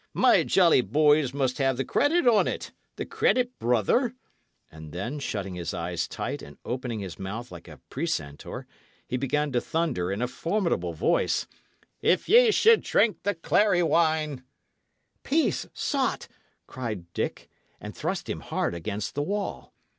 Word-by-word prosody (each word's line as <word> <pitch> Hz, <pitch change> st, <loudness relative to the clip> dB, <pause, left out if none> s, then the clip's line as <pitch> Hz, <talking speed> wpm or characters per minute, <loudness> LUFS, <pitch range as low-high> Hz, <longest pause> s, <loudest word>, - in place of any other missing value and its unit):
"My -, -, +5 dB
jolly 170 Hz, -8 st, +4 dB
boys 145 Hz, +3 st, +3 dB
must 135 Hz, -1 st, -1 dB
have 135 Hz, -2 st, +2 dB
the 135 Hz, -, -1 dB
credit 315 Hz, +2 st, +2 dB
on't 230 Hz, -4 st, +2 dB, 0.2 s
the -, -, -4 dB
credit, 250 Hz, 0 st, +1 dB
brother;" 125 Hz, -, +2 dB, 0.6 s
and 80 Hz, -1 st, -11 dB
then, 110 Hz, -, -4 dB
shutting 100 Hz, -8 st, -4 dB
his 85 Hz, -2 st, -4 dB
eyes 85 Hz, 0 st, -2 dB
tight -, -, -4 dB
and 70 Hz, 0 st, -12 dB
opening 125 Hz, -3 st, -3 dB
his 95 Hz, -4 st, -7 dB
mouth 105 Hz, +6 st, -6 dB
like -, -, -11 dB
a -, -, -12 dB
precentor, 70 Hz, 0 st, -4 dB, 0.4 s
he 125 Hz, -, -3 dB
began 145 Hz, +3 st, 0 dB
to 120 Hz, -1 st, +1 dB
thunder, 155 Hz, -, -1 dB
in 100 Hz, -, -2 dB
a 125 Hz, -, 0 dB
formidable 165 Hz, -, -1 dB
voice: 80 Hz, -, +1 dB, 0.6 s
"If 185 Hz, -, +2 dB
ye 470 Hz, +4 st, +7 dB
should 445 Hz, +1 st, +5 dB
drink 220 Hz, -, +2 dB
the 205 Hz, 0 st, -1 dB
clary 175 Hz, +2 st, +2 dB
wine" 155 Hz, -5 st, +1 dB, 0.8 s
"Peace, 315 Hz, +3 st, 0 dB
sot!" 275 Hz, -3 st, -1 dB, 0.4 s
cried 105 Hz, -9 st, -6 dB
Dick, -, -, -3 dB, 0.3 s
and -, -, -8 dB
thrust -, -, -3 dB
him -, -, -3 dB
hard -, -, -2 dB
against 100 Hz, +4 st, -4 dB
the 145 Hz, -, -1 dB
wall. 200 Hz, +6 st, -3 dB
135 Hz, 150 wpm, -27 LUFS, -, 0.8 s, ye